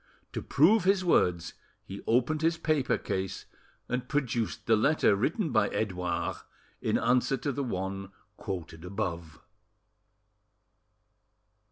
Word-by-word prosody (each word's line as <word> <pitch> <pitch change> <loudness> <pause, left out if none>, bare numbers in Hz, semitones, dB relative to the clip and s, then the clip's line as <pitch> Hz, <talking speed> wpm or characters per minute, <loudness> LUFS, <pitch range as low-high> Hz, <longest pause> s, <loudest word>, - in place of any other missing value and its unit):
To - - -3
prove 180 +8 +4
his 190 0 +2
words, 90 - +2 0.3
he 100 +1 -8
opened 130 +7 +2
his 165 +1 +2
paper 155 -5 +1
case, 95 0 -4 0.4
and 125 0 -3
produced 125 -6 -1
the 115 - +4
letter 125 -1 +3
written 155 - 0
by 110 -2 +3
Edouard 90 -5 -2 0.4
in - - +1
answer 125 +2 +2
to 140 +3 -2
the 140 +1 -2
one 95 -4 -4 0.3
quoted 85 -6 -6
above. 85 -5 -4
115 Hz, 120 wpm, -29 LUFS, 95-145 Hz, 0.4 s, prove